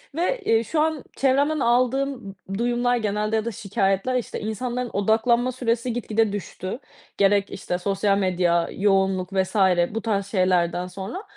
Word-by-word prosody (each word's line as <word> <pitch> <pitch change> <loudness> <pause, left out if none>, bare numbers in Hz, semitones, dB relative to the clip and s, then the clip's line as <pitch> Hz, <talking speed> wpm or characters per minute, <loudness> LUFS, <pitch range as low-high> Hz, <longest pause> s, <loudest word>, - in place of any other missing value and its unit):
ve, 395 +8 0
eee, 225 0 +3
şu 305 +5 0
an 315 -2 0
çevremden 280 +3 +2
aldığım, 255 +3 +2
ımm, 195 -6 -10 0.2
duyumlar 245 +1 +1
genelde 215 0 -1
ya 220 0 0
da 235 - -2
şikâyetler, 195 +3 0
işte, 250 - -3
insanların 240 +3 -3
odaklanma 230 +5 +2
süresi 240 -1 -1
gitgide 225 -2 0
düştü, 190 +1 -5 0.4
gerek 200 0 +3
işte 180 -2 -3
sosyal 195 +1 +1
medya, 175 -3 +1
yoğunluk 195 -1 +1
vs. 190 +2 0 0.4
bu 225 - -1
tarz 200 -3 -1
şeylerden 180 -2 +1
sonra. 195 - -6
215 Hz, 150 wpm, -24 LUFS, 195-245 Hz, 0.4 s, eee